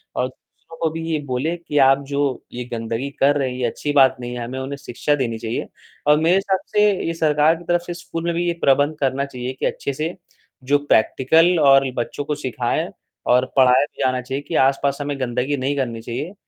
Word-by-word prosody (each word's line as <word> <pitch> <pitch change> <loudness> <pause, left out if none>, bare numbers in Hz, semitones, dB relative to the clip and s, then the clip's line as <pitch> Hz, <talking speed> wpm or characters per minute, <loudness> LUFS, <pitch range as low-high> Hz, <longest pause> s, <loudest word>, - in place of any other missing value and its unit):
और 125 - 0
दूसरों 145 +5 -18
को 160 - +2
भी 165 +1 -5
ये 155 - 0
बोले 135 +6 -1
कि 160 -3 -4
आप 135 0 +5
जो, 140 -2 -1
ये 125 0 -4
गंदगी 115 +3 -3
कर 145 +2 +4
रहे 135 -2 0
है - - -6
ये 125 - -1
अच्छी 145 +5 -3
बात 135 -2 +5
नहीं 120 0 -5
है, 120 - -4
हमें 130 +2 -5
उन्हें 135 +2 -5
शिक्षा 140 +2 -1
देनी 120 -5 -2
चाहिए 110 +1 -3 0.4
और 150 0 +6
मेरे 165 +3 +3
हिसाब 195 -1 0 0.2
से 210 0 +5 0.2
ये 165 - -1
सरकार 155 0 +3
की 170 - -11
तरफ 175 0 +1
से 175 - -3
स्कूल 165 -1 -6
में 170 0 0
भी 175 +1 0
ये 170 - +1
प्रबंध 145 +3 +3
करना 135 0 0
चाहिए 125 -1 -5
कि - - -1
अच्छे 140 - -2
से 155 +5 -3 0.6
जो 145 - +6
प्रैक्टिकल 160 +9 +3
और 135 -2 +5
बच्चों 120 +4 -3
को 150 0 -2
सिखाया 125 -4 -2 0.4
और 125 +1 +4
पढ़ाया 130 +1 +5
भी - - -11
जाना 130 -1 +1
चाहिए 135 +3 -4
कि 165 - -3
आसपास 140 0 0
हमें 145 -1 -3
गंदगी 125 +3 -1
नहीं 135 +2 -1
करनी 120 -4 -2
चाहिए 120 - -5
140 Hz, 220 wpm, -21 LUFS, 130-155 Hz, 0.6 s, और